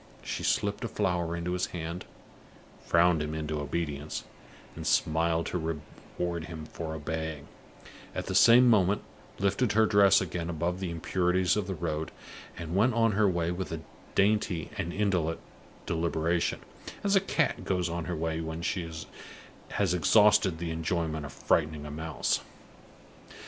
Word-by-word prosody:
She - - -4
slipped - - 0
a - - -1
flower 85 -2 -1
into 85 +1 -3
his 90 - 0
hand 85 0 -5 0.8
frowned 85 -1 +4
him 75 +1 -3
into 75 -1 -3
obedience, 75 -1 -3 0.5
and - - -5
smiled 80 +1 +2
to 80 -2 -2 0.4
reward 85 -2 -2
him 80 -3 -7
for 80 0 -6
obeying, 80 -1 -4 0.7
at - - -3
the - - -3
same 120 +2 +7
moment 105 -3 +4 0.3
lifted 100 +3 +1
her 110 +1 +5
dress 100 -2 +6
again 85 -2 -3
above 85 +2 -1
the 95 -2 -3
impurities 90 +2 +1
of 105 -3 -1
the 95 - -3
road 80 -1 -2 0.5
and 85 0 -5
went 115 +5 +3
on 115 -1 +4
her 105 0 +3
way 85 -1 0
with 90 0 -4
a 80 -1 -4 0.3
dainty 100 -4 +2
and 95 -5 -3
indolent 90 -5 0 0.5
deliberation, 85 +1 0 0.4
as 200 0 +3
a 195 - +5
cat 165 -5 0
goes 90 -2 0
on 85 -1 -3
her 90 - -3
way 80 0 -2
when 80 +1 -5
she 85 -1 -2 0.8
has 95 -4 +1
exhausted 105 +1 +5
the 85 0 -3
enjoyment 80 -2 -2
of - - -10
frightening 75 -2 0
a 75 - -6
mouse. 80 0 -1
85 Hz, 155 wpm, -29 LUFS, 80-95 Hz, 0.8 s, same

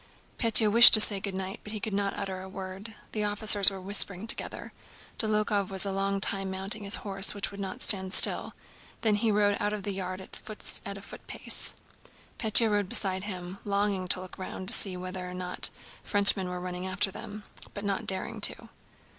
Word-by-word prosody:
Pétya 225 -2 +4
wished 235 +2 +9
to - - +7
say 205 -2 +4
"Good 195 -1 -7
night" 190 0 -7
but 210 -1 -9
could 220 - -5
not 200 0 -4
utter 190 -1 -7
a 190 - -12
word. 190 +3 -10 0.2
The 215 - -4
officers 205 -1 +6
were 195 -1 -10
whispering 195 0 +1
together. - - 0 0.5
Dólokhov 210 -2 -2
was 190 0 +4
a 200 - -4
long 195 +1 -3
time 195 0 -2
mounting 195 +3 -3
his 200 - +3
horse 195 0 0
which 200 - -6
would 200 - -12
not 190 -1 -7
stand 190 -2 +4
still, - - +3 0.5
then 220 -2 0
he 215 +2 -1
rode 205 -1 0
out 205 0 -3
of 210 -2 -7
the 200 - -5
yard 185 -1 -7
at 190 - -13 0.6
a - - -13
footpace. 200 - -4 0.6
Pétya 220 0 +4
rode 205 -2 -2
beside 190 0 -2
him, 185 -1 -9
longing 200 -2 -3
to 180 - +1
look 185 0 -13
round 185 0 -7
to - - -1
see 185 -3 -2
whether 185 0 -8
or 180 - -10
not 180 0 -1 0.3
the - - -19
French 205 -1 +6
were 180 -2 -7
running 180 +1 -8
after 190 +1 0
them, 210 0 -11 0.3
but 205 0 -8
not 200 -1 -5
daring 190 -1 -3
to. - - +3
195 Hz, 195 wpm, -26 LUFS, 190-210 Hz, 0.6 s, wished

